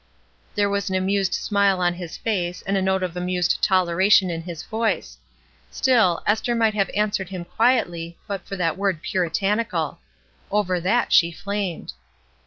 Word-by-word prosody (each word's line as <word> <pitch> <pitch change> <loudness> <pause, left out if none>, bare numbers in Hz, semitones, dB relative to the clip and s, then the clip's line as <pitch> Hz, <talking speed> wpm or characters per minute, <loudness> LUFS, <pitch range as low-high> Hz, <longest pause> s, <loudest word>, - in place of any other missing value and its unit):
There 205 -1 +2
was 200 0 -1
an 190 - -1
amused 190 0 +1
smile 200 -2 +1
on 175 -1 +2
his 175 -2 -7
face 180 -5 -2
and 195 - -1
a 195 - +1
note 190 0 +1
of 180 -1 -3
amused 180 -1 0
toleration 185 0 +3
in 165 -1 -4
his 165 -1 -7
voice. 225 0 -2 0.5
Still, 225 -10 +2
Esther 220 +3 +1
might 225 -2 +2
have 200 -2 0
answered 205 -3 0
him 185 -3 -6
quietly 175 -7 0
but 200 -3 -5
for 195 - -5
that 170 -2 -1
word 195 -5 -1
"Puritanical." 185 0 -1 0.5
Over 190 -3 0
that 205 +8 +1
she 170 -1 +5
flamed. 200 -1 -4
190 Hz, 160 wpm, -23 LUFS, 175-205 Hz, 0.5 s, she